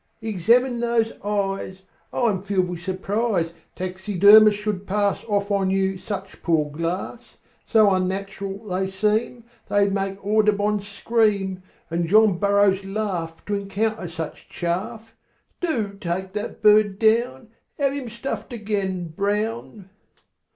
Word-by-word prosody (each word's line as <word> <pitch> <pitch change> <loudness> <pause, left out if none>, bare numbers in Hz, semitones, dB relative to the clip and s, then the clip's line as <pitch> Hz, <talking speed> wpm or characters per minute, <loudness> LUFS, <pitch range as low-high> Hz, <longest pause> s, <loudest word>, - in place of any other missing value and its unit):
"Examine 235 +5 +2
those 235 -1 +1
eyes. 195 -2 -2 0.3
I'm 215 -7 0
filled 190 -2 0
with 175 -1 -6
surprise 190 -1 -1 0.2
Taxidermists 205 +3 +5
should 210 -2 -3
pass 205 0 0
Off 205 -1 -1
on 195 -2 +1
you 190 0 0
such 195 -1 -6
poor 155 -3 +1
glass; 175 +9 -5 0.3
So 215 -2 +5
unnatural 195 +2 -3
they 190 -1 -2
seem 215 +5 0 0.3
They'd 200 -1 +3
make 195 0 -2
Audubon 210 0 +2
scream, 200 -2 0 0.3
And 170 0 0
John 210 -1 +4
Burroughs 200 -1 +3
laugh 195 -5 -4
To 205 - -3
encounter 200 0 -2
such 165 -2 -7
chaff. 220 +6 -4 0.5
Do 230 - -1
take 185 +2 -3
that 210 +2 -5
bird 210 -2 +5
down; 225 +2 +1 0.3
Have 275 -2 +1
him 275 -4 -5
stuffed 255 +3 -5
again, 200 -6 -3
Brown!" 210 +3 -3
200 Hz, 125 wpm, -23 LUFS, 190-215 Hz, 0.5 s, Taxidermists